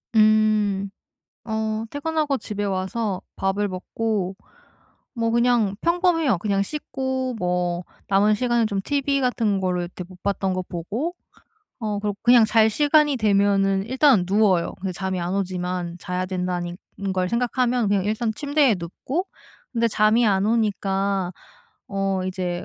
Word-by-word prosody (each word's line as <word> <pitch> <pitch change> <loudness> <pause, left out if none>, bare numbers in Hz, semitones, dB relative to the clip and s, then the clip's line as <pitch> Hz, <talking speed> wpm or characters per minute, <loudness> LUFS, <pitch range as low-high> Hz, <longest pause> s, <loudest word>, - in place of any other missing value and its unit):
음 215 -2 +3 0.6
어 220 0 -2
퇴근하고 295 -1 -1
집에 205 -4 -5
와서 195 +1 -2
밥을 195 +2 0
먹고 195 0 -3 0.8
뭐 230 -2 0
그냥 235 -3 +2
평범해요. 340 - +2
그냥 195 +2 0
씻고 260 -1 -3
뭐 180 -1 -1 0.2
남은 200 +2 +4
시간은 240 0 +1
좀 200 -2 -2
TV 280 +2 0
같은 225 -6 +1
거를 180 -2 -1
그렇게 180 0 -8
못 180 0 -16
봤던 195 -1 0
거 185 - -1
보고 205 - -4 0.7
어 210 -2 -2
그러고 205 -1 -2
그냥 240 -1 +6
잘 220 0 +4
시간이 295 +2 +3
되면은 200 -2 +2
일단은 255 -4 +4
누워요. 195 -3 +2
근데 190 0 -3
잠이 190 0 -3
안 175 +2 -2
오지만 180 -2 -3
자야 180 0 -2
된다니 180 -1 -3 0.2
는 195 -1 -3
걸 185 -1 0
생각하면 245 0 +1
그냥 200 -2 +1
일단 220 +2 -1
침대에 285 -2 +2
눕고 260 - -4 0.5
근데 235 -1 +2
잠이 225 +1 +3
안 195 -1 +2
오니까 195 -4 0 0.6
어 195 -1 -1
이제 180 -2 -3
205 Hz, 280 characters per minute, -23 LUFS, 190-235 Hz, 0.8 s, 그냥